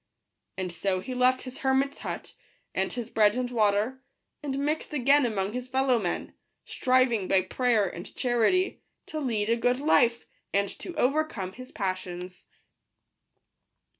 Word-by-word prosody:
And 185 -2 -3
so 185 +2 0
he 255 +7 -6
left 255 +1 +3
his 255 0 -7
hermits 270 +1 +1
hut, - - -6 0.4
and - - -1
his 240 -1 -5
bread 210 -1 +4
and 250 -1 -2
water, 220 +3 +1 0.4
and 275 -2 -3
mixed 300 +2 -1
again 275 0 +4
among 200 -2 -2
his 250 0 -4
fellow 260 -1 +2
men, 180 -5 -3 0.3
striving, 255 -6 +2
by 190 -1 +3
prayer 230 0 +2
and 175 +2 -8
charity, 255 - +1 0.2
to 310 - -5
lead 225 -7 -1
a 230 - +3
good 245 +1 +1
life, 240 -5 +3 0.3
and 200 0 +2
to 350 - -7
overcome 270 -10 0
his 255 +3 -11
passions. 185 -3 -4
245 Hz, 145 wpm, -28 LUFS, 200-265 Hz, 0.4 s, bread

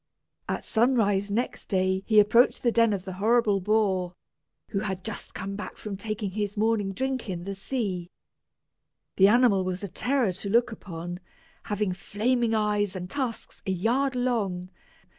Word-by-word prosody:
At - - -2
sunrise 220 -4 +2
next 230 +5 -2
day 190 -1 +1
he 215 -2 +6
approached 220 +4 +4
the 240 - +3
den 230 -1 +4
of 195 -3 -2
the 190 - -5
horrible 225 -2 +3
boar, 190 -3 +1 0.5
who 195 - -1
had 190 -2 -3
just 220 -5 -6
come 190 +3 -4
back 210 - -7
from 210 -2 -5
taking 205 0 -4
his 205 +1 -3
morning 215 -2 +1
drink 260 +2 -2
in 175 -2 -4
the 195 +2 -4
sea. 195 -4 -3 1.1
The 195 - +7
animal 220 -3 +4
was 185 +1 -3
a - - -2
terror 250 +2 +1
to 195 +2 -4
look 235 +3 +3
upon, 175 -4 -7 0.5
having 205 -3 -1
flaming 225 +5 0
eyes 210 -2 +1
and 180 -1 -6
tusks 260 -5 -4
a - - +1
yard 245 +9 +1
long. 200 -8 -1
205 Hz, 160 wpm, -27 LUFS, 190-230 Hz, 1.1 s, The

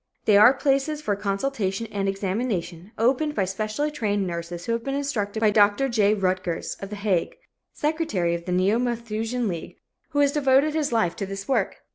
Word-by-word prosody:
They 210 - +5
are 215 +6 +8
places 275 +2 +1
for 210 -9 -1
consultation 200 +1 -2
and 195 -1 -1
examination, 195 -2 -3
opened 270 +6 +1
by 195 - +1
specially 215 +10 -2
trained 205 -8 -1
nurses 170 0 -5
who - - -2
have 230 0 -1
been 275 +2 -2
instructed 220 -7 -2
by 215 -2 +4
Dr. 205 +5 +4
J. 215 -3 +3
Rutgers, 185 -3 -2
of 195 - -7
The 210 - -5
Hague, 200 -4 0 0.4
secretary 295 - -1
of 170 0 -4
the 180 - -3
Neo 190 +5 +2
Malthusian 235 0 -2
League, 170 -4 -5 0.3
who 300 - -5
has 285 -1 +4
devoted 280 +1 +3
his 305 -3 0
life 220 -8 +1
to 195 - -3
this 195 0 -6
work. 270 - -1
215 Hz, 185 wpm, -24 LUFS, 195-270 Hz, 0.4 s, are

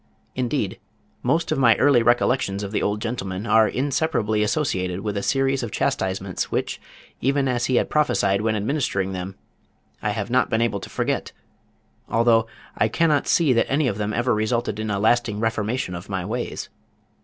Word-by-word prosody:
Indeed 125 -4 -2 0.4
most 160 +7 0
of - - +1
my 115 -4 +6
early 135 -3 +4
recollections 120 -4 +1
of 100 - -5
the 110 - 0
old 105 +1 0
gentleman 105 -4 -4
are 110 -1 +5
inseparably 130 -6 0
associated 95 - -1
with 105 -1 -3
a 100 - -1
series 135 +3 +1
of 120 - -3
chastisements 95 -2 -2
which, - - -2 0.4
even 135 +1 +1
as 120 -2 0
he 130 - +1
had - - +2
prophesied 105 -10 +2
when 110 0 0
administering 105 -4 -1
them, 95 +1 -5 0.7
I 105 - -1
have 105 +2 -3
not 130 +1 +3
been 110 - +1
able 115 -3 0
to - - -9
forget, - - -2 0.8
although 115 -1 +3 0.3
I 110 - +2
cannot 150 +5 +1
see 155 -6 +3
that 115 - +1
any 140 0 +2
of 105 -3 -2
them 105 0 -1
ever 120 +3 +1
resulted 110 0 -1
in 110 0 -3
a 100 - 0
lasting 110 0 +2
reformation 110 -2 -1
of 90 +3 -8
my 95 -2 -2
ways. 120 +4 -4
115 Hz, 180 wpm, -23 LUFS, 100-130 Hz, 0.8 s, my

